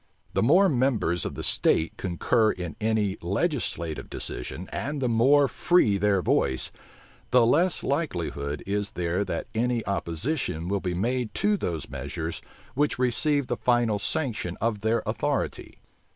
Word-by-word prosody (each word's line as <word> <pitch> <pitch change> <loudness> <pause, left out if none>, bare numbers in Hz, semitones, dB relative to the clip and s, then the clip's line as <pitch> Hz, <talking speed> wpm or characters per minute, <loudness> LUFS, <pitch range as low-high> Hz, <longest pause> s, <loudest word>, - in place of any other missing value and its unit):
The - - +1
more 175 - +5
members 120 - +1
of - - -4
the - - -5
state 80 - +2
concur 110 +5 +1
in 90 -3 -6
any 105 -2 0
legislative 95 - -2
decision, 80 +9 -5
and 145 +4 -3
the 130 - 0
more 135 +5 +4
free 115 - +2
their 100 -2 +2
voice, 65 - +2 0.6
the 125 -1 +5
less 165 +9 +2
likelihood 80 - -2
is 100 +1 -2
there 90 +2 -1
that 85 - -3
any 120 0 0
opposition 90 - -1
will 100 0 0
be 90 -2 -2
made 120 +4 -1
to 210 0 +2
those 85 - -3
measures 70 +5 -5 0.3
which 145 +2 +1
receive 135 +3 +2
the - - -2
final 120 -4 +2
sanction 115 - -2
of 110 -2 -1
their 110 +1 +1
authority. - - -2
110 Hz, 145 wpm, -26 LUFS, 90-130 Hz, 0.6 s, more